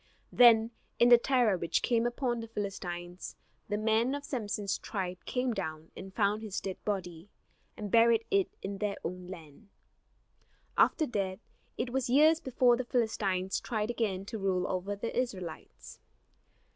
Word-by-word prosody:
Then 230 -2 +6 0.3
in 240 - +5
the 240 -1 +9
terror 240 -7 +2
which 170 - 0
came 235 -1 +2
upon 240 -1 -1
the 230 - -6
Philistines 180 -4 -5 0.3
the 205 - 0
men 220 +5 +1
of 285 - -6
Samson's 210 -5 -2
tribe 185 -3 -4
came 250 -1 -1
down 160 -5 -5
and 190 +1 -9
found 205 +1 +1
his 210 -3 -4
dead 190 -1 -6
body, 180 -3 -4 0.5
and 205 -2 -5
buried 230 -1 +5
it 395 -2 +3
in 195 0 -4
their 205 0 -1
own 180 +1 -5
land. 170 +2 -11 1.1
After 315 - +3
that 195 -7 -2 0.4
it 240 0 -2
was 260 -1 -1
years 310 +5 +5
before 255 -3 +3
the 255 - -2
Philistines 200 -6 0
tried 215 -1 -2
again 200 -5 -2
to 220 +1 -6
rule 185 -2 0
over 190 +2 -2
the 215 +3 -5
Israelites. 185 -10 -5
210 Hz, 155 wpm, -31 LUFS, 190-240 Hz, 1.1 s, the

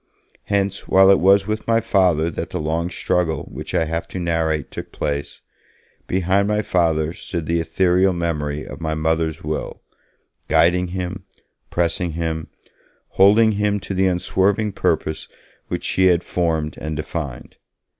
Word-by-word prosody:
Hence, 100 -1 -1
while 95 +1 +6
it 100 - +5
was 95 +2 +5
with 110 +1 -3
my 115 0 +4
Father 90 -7 +2
that - - -5
the - - -4
long 80 +3 -1
struggle 90 -2 -1
which - - -6
I 80 - +2
have 80 +2 -3
to - - -7
narrate 80 -4 -1
took - - -7
place, 70 -1 -4 0.6
behind 95 +2 +1
my 105 0 0
Father 80 -4 +1
stood 85 -4 -5
the 85 +1 0
ethereal 90 +3 +2
memory 75 -4 -2
of - - -9
my 80 -1 -1
Mother's 80 0 -1
will, 75 +1 -4 0.6
guiding 90 +2 +3
him, 95 +1 -5 0.4
pressing 85 0 -1
him, 80 -1 -3 0.6
holding 105 +3 +5
him 105 0 0
to 95 - -5
the 95 0 +2
unswerving 95 +3 +1
purpose 80 -4 -1 0.4
which - - -4
she 95 0 +2
had 90 -1 +3
formed 80 -4 -1
and 80 0 -3
defined. 75 -6 -6
85 Hz, 150 wpm, -21 LUFS, 80-95 Hz, 0.6 s, while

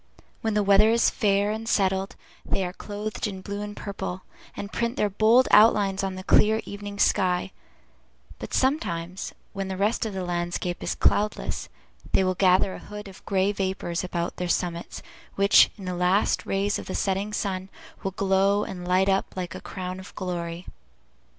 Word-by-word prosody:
When 220 -1 -1
the 210 - +3
weather 200 +2 +6
is 230 +1 +3
fair 200 -1 +2
and 220 +1 -4
settled, 190 -1 +1 0.3
they 190 - -1
are 180 - -5
clothed 210 +2 -4
in 190 -2 -6
blue 200 +1 -5
and 210 0 -6
purple, 190 -2 -5 0.3
and 200 - -6
print 235 +1 -1
their 210 -5 +1
bold 220 +6 +5
outlines 205 -3 +5
on 190 -1 -2
the 185 - -7
clear 215 +3 +4
evening 205 0 -7
sky; 185 -2 +2 0.9
but - - -7
sometimes, 185 - -1 0.2
when 195 -1 -3
the 190 -1 -4
rest 205 +4 +1
of 205 - -6
the 190 - -2
landscape 175 0 -2
is - - -2
cloudless, 210 +1 0 0.4
they - - +4
will 185 0 +1
gather 185 +1 +3
a - - -7
hood 210 0 -9
of 190 - -13
gray 195 0 +2
vapors 190 -3 -2
about 175 -1 -3
their 180 -1 -3
summits, 175 -1 -2 0.3
which, 200 0 +6
in 195 - -9
the 180 - -2
last 180 +3 +1
rays 200 +1 0
of - - -9
the - - -4
setting 195 +1 -1
sun, 190 -2 -3 0.3
will 195 - -1
glow 195 +2 +2
and 180 -3 -6
light 185 +1 +3
up 195 0 0
like 180 -2 -4
a - - -8
crown 185 0 -6
of 190 - -12
glory. 175 -2 -4
195 Hz, 180 wpm, -26 LUFS, 185-205 Hz, 0.9 s, weather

